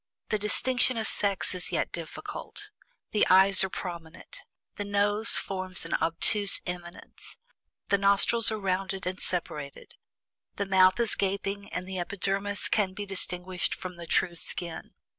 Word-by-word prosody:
The 215 - 0
distinction 250 +4 +3
of 220 - -1
sex 200 -4 +1
is 180 -1 +1
yet - - -1
difficult. - - -7 0.4
The 210 - +3
eyes 190 +1 +6
are 190 - -1
prominent. 170 -2 -8 0.4
The 205 - -2
nose 205 +2 +2
forms 185 -2 -2
an 165 - -5
obtuse 200 +5 +2
eminence. 175 -1 -8 0.5
The 200 - +3
nostrils 200 +4 +4
are 220 - -2
rounded 195 0 -2
and 185 +2 -3
separated. 150 -5 -4 0.6
The 200 - -2
mouth 185 +1 +5
is 235 -2 +3
gaping, 200 +1 -1
and 180 0 -4
the 190 -1 -4
epidermis 195 +3 -2
can 195 -3 0
be 205 - -5
distinguished 180 -1 -3
from 185 -1 -7
the 170 -1 -9
true 175 +1 +1
skin. 170 0 -6
195 Hz, 145 wpm, -28 LUFS, 180-205 Hz, 0.6 s, eyes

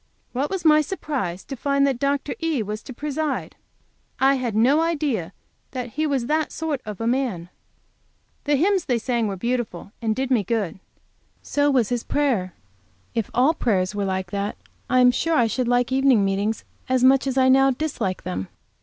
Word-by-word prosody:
What 270 +4 -1
was 380 -3 -4
my 305 -1 +6
surprise 285 - -3
to 275 - -7
find 280 +2 +1
that 270 -3 0
Dr. 280 +1 0
E. 320 -8 0
was 210 +1 -5
to - - -10
preside! 295 +2 -3 0.6
I 270 +1 +5
had 250 -5 -2
no 260 +8 +4
idea 290 - -1 0.4
that 250 -2 -4
he 310 +6 -1
was 270 -5 0
that 310 +3 0
sort 310 -5 -3
of 210 -3 -6
a 225 - -2
man. 235 -9 -1 1.0
The 290 0 +3
hymns 370 +4 +2
they 245 - +1
sang 235 -1 0
were 200 - -3
beautiful, 230 -3 -3
and 220 -2 0
did 265 +1 -2
me 235 -5 +3
good. 200 -3 -2 0.6
So 290 0 +1
was 255 -6 +2
his 245 -2 -1
prayer. 240 -12 0 0.6
If 225 -3 -2
all 265 +6 +4
prayers 195 - 0
were 205 -1 -1
like 190 -2 -2
that, 200 +1 -3 0.3
I 255 0 +4
am 250 0 +7
sure 330 +6 0
I 240 - +4
should 240 +2 -1
like 245 +1 +2
evening 260 -6 +4
meetings 200 +3 -1 0.3
as 255 -1 +2
much 270 +1 +5
as 265 0 -1
I 260 0 +5
now 270 +1 +5
dislike 250 -9 -2
them. 95 +1 -4
255 Hz, 190 wpm, -23 LUFS, 215-280 Hz, 1.0 s, am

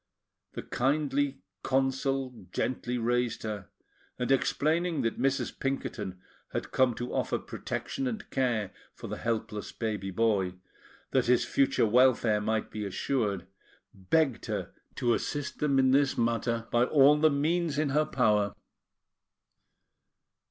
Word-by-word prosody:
The - - -5
kindly 140 0 0 0.2
Consul 135 -1 -1
gently 125 -1 -2
raised 120 0 0
her, 105 -4 -5 0.5
and 125 +1 -1
explaining 160 +5 +1
that 115 - -1
Mrs. 135 -2 0
Pinkerton 110 -8 -3 0.3
had - - -3
come 130 -3 +3
to 120 - -5
offer - - 0
protection 270 -1 -4
and 225 -4 -4
care 120 -7 0 0.2
for - - -10
the - - -4
helpless 110 -2 -3
baby 105 -4 -3
boy, 95 -3 +1 0.6
that 130 -3 +2
his 125 -1 +4
future 135 -4 +2
welfare 115 -2 +4
might 110 +1 -1
be 105 - -4
assured, 100 -1 -1 0.5
begged 130 - 0
her - - -3 0.2
to 120 -1 +2
assist 145 +3 -3
them 145 -2 +2
in 130 -1 +4
this 140 0 +3
matter 115 0 0
by 120 0 +4
all 145 +2 +6
the 155 +1 +5
means 155 +1 0
in 150 -1 +1
her 150 +3 +2
power. 105 -7 +2
125 Hz, 130 wpm, -29 LUFS, 110-140 Hz, 0.6 s, all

